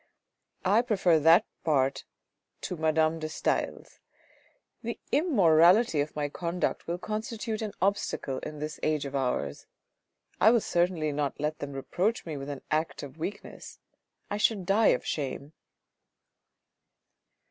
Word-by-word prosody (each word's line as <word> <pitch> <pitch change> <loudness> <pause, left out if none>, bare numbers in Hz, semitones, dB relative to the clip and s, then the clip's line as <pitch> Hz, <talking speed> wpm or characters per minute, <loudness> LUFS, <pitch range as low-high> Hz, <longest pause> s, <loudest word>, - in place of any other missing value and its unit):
I 205 +5 +5
prefer 190 -9 +3
that 165 +3 +6 0.2
part 135 -3 +1 0.6
to 180 - -4
Madame 160 0 +1
de 155 0 -4
Stael's; - - -2 0.8
the 235 0 -5
immorality 190 - +4
of 145 - -4
my 150 -1 -1
conduct 170 +4 -3
will 170 +1 -2
constitute 215 +3 -4
an 215 -2 -4
obstacle 190 -8 -1
in 150 - -7
this 150 +1 -5
age 155 -2 0
of 140 0 -5
ours. 125 - -2 0.7
I 220 - +7
will 235 +1 +5
certainly 170 -4 0
not 145 -1 -2
let 150 +1 -2
them 140 -1 -5
reproach 185 +11 -1
me 160 -3 -5
with 140 0 -6
an 140 -2 -6
act 155 0 -1
of 145 +2 -10
weakness; 195 +6 -7 0.5
I 205 - -3
should 210 -3 +1
die 205 +4 +4
of - - +2
shame." 140 +1 -4
160 Hz, 135 wpm, -28 LUFS, 145-200 Hz, 0.8 s, I